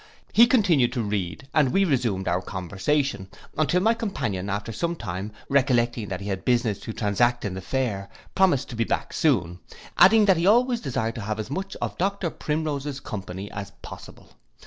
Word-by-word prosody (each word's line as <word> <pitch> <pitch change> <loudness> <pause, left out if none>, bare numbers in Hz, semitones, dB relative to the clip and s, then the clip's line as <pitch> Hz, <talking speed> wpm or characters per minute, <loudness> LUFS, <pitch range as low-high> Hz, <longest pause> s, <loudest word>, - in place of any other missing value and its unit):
He 235 +2 +7
continued 175 - +3
to 120 -4 -1
read, 100 - -3
and 145 -5 +3
we 195 +5 +3
resumed 120 - 0
our 90 +1 +1
conversation, 100 - -2 0.3
until 165 +4 +2
my 225 +2 +4
companion, 105 - -3
after 100 +2 -3
some 170 +10 -2
time, 95 - -5 0.2
recollecting 120 -5 +2
that 95 0 -5
he 100 - -5
had 95 -1 -3
business 120 -5 +1
to - - -6
transact 120 +3 +1
in 100 - -2
the 95 - -5
fair, 100 -4 -2 0.2
promised 180 -9 +2
to 120 - -6
be 115 0 0 0.2
soon 100 - +1
back; 90 - -17 0.3
adding, 210 +4 +7
that 190 -3 +4
he 170 +3 +1
always 240 +3 +4
desired 115 -5 -2
to 115 - -6
have 105 +1 -3
as 110 +4 -5
much 195 +5 -4
of - - -4
Dr 190 -2 0
Primrose's 150 -2 -3
company 95 -4 -6
as 100 0 -7
possible. - - -11
120 Hz, 185 wpm, -25 LUFS, 100-160 Hz, 0.3 s, He